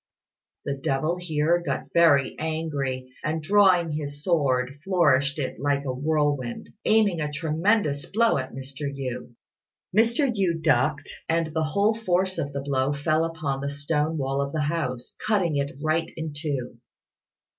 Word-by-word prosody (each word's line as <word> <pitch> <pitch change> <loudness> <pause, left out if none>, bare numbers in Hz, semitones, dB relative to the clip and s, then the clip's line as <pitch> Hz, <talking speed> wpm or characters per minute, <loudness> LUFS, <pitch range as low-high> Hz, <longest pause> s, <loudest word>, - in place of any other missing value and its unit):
The 140 - -1
devil 140 +5 -1
here 170 0 +1
got - - -4
very 145 -6 +4
angry, 140 -5 -3
and 155 +1 -1
drawing 185 -3 +4
his 145 -1 -5
sword 140 -6 +1
flourished 145 -7 +3
it 135 -4 -3
like 140 0 0
a 130 - -1
whirlwind, 145 -3 -1
aiming 210 -6 +3
a 150 0 -2
tremendous 155 +1 0
blow 230 -5 +2
at 130 0 -5
Mr. 135 +2 -6
Yü. 125 -3 -6 0.6
Mr. 235 +6 +4
Yü 180 -5 +1
ducked, 140 -1 +1
and 165 -1 0
the 160 -1 +1
whole 200 +8 +2
force 190 -4 0
of 140 - -2
the 140 0 -3
blow 135 0 0
fell 155 +2 +1
upon 155 -5 -2
the 140 - -2
stone 150 +2 -1
wall 135 0 -1
of 140 0 -3
the 155 - 0
house, 145 -5 -3
cutting 190 -8 +2
it 140 -1 -2
right 160 +1 0
in 160 -2 -4
two. 140 -6 -4
150 Hz, 155 wpm, -25 LUFS, 140-170 Hz, 0.6 s, very